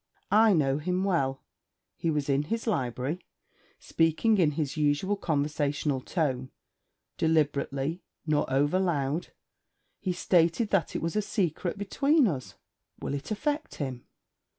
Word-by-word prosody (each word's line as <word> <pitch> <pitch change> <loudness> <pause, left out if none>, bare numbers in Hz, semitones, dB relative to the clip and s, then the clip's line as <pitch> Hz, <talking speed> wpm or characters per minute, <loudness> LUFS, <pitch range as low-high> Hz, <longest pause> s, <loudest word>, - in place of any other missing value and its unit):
I 215 +1 +6
know 140 -4 +2
him 180 +4 -1
well. 135 -9 0 0.5
He 165 - -1
was 150 -3 0
in 140 +1 +1
his 230 +7 -2
library, 140 - -1 0.5
speaking 165 +7 +2
in 155 -4 +3
his 150 0 -2
usual 150 +6 +1
conversational 145 -4 -1
tone, 130 -5 -1 0.7
deliberately, 150 0 +1 0.2
nor 150 -3 +1
overloud. 145 +1 +1 0.7
He 185 - -1
stated 175 +4 +2
that 195 -4 +1
it - - -2
was 165 +3 -2
a 210 - +3
secret 185 -3 -1
between 275 +8 +3
us.' 140 -9 -4 0.4
'Will - - -3
it 140 0 -4
affect 295 +8 -2
him?' 130 -4 -5
160 Hz, 130 wpm, -28 LUFS, 140-190 Hz, 0.7 s, I